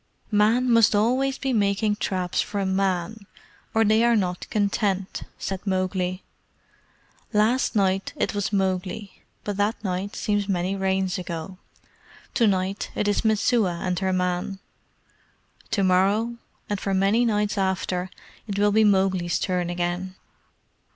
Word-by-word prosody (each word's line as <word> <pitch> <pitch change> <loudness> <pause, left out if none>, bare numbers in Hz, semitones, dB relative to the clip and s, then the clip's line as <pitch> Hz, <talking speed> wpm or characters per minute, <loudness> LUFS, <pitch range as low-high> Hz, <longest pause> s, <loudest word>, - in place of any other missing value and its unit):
"Men 220 +4 +3
must 230 -3 +5
always 255 +6 +2
be 270 -2 -2
making 210 0 +1
traps 185 -4 -1
for 200 -2 -2
men, 190 +2 -1 0.4
or 225 0 +3
they 215 +2 +4
are 235 0 +4
not 180 -4 -1
content," 200 -2 0 0.2
said 195 -1 -4
Mowgli. 185 -1 -1 1.1
"Last 225 +5 +2
night 195 -1 +1
it - - -1
was 205 0 -2
Mowgli 190 0 -2 0.2
but 205 -1 -3
that 205 +3 0
night 190 +1 -3
seems 205 -1 -1
many 185 +1 0
Rains 190 -1 0
ago. 175 +1 -6 0.7
To 235 -4 +3
night 190 0 -1
it 210 - 0
is 205 - +1
Messua 215 -4 +2
and 180 -2 -1
her 190 -1 0
man. 180 +1 -1 1.1
To 200 - +1
morrow, 200 +6 +2 0.3
and 205 -1 -2
for 195 - -2
very - - +2
many 205 +5 +3
nights 210 -3 +1
after, 190 -2 -1 0.4
it 200 -2 -3
will 205 0 +3
be 220 +1 +4
Mowgli's 190 -4 +2
turn 180 -2 -1
again." 175 +1 -3
195 Hz, 140 wpm, -24 LUFS, 185-210 Hz, 1.1 s, must